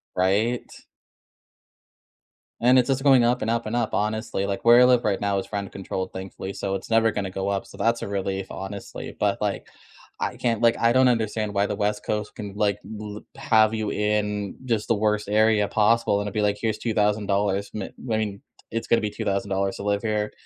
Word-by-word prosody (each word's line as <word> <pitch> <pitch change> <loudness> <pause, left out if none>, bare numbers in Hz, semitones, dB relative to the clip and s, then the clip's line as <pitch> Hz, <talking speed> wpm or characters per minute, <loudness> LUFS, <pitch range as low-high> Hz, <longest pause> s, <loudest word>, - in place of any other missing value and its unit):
Right? 105 +6 +1 1.9
And 125 +2 +6
it's 125 - +1
just 135 +1 0
going 135 -4 +6
up 125 +1 +2
and 110 - 0
up 115 0 -1
and 110 +2 -3
up 120 -2 -1
honestly. 105 -2 -1
Like 100 +2 -4
where 120 +1 +8
I 125 - +8
live 125 -1 +4
right 100 -2 0
now 100 -1 +1
is 95 - -8
rent 100 -1 -3
controlled 95 -1 -4
thankfully, 95 +1 -6
so 95 0 -3
it's 95 - -7
never 115 0 +4
going 105 -2 -3
to - - -3
go 95 +1 -3
up. 100 -1 -1
So - - -13
that's 115 +1 +1
a - - -4
relief 95 -1 -3
honestly. 95 +1 -7
But, - - +1
like, - - -2 0.5
I - - -2
can't, 115 -2 0
like, 115 -1 +4
I 115 - +4
don't 130 0 +5
understand 110 -3 0
why 100 0 +2
the 105 - -2
West 105 0 -1
Coast 105 -1 -2
can 100 -2 -7
like 105 -1 +1
li 105 -1 -7
have 110 -1 +3
you 110 -1 -2
in 105 -1 -1
just 115 -4 -1
the 115 - +3
worst 105 0 0
area 110 -1 +3
possible 110 0 +2
and 105 - -3
it'd 100 - -5
be 110 - 0
like, 105 0 +1
here's 110 -2 0
$2,000. 105 -2 0
M 105 - -3
I 115 +2 -4
mean, 105 -2 -3 0.3
it's 115 0 -3
gonna 115 - +3
be 105 -1 -2
$2,000 100 0 -1
to - - -6
live 100 0 0
here. 105 -1 -1
105 Hz, 210 wpm, -24 LUFS, 100-115 Hz, 1.9 s, where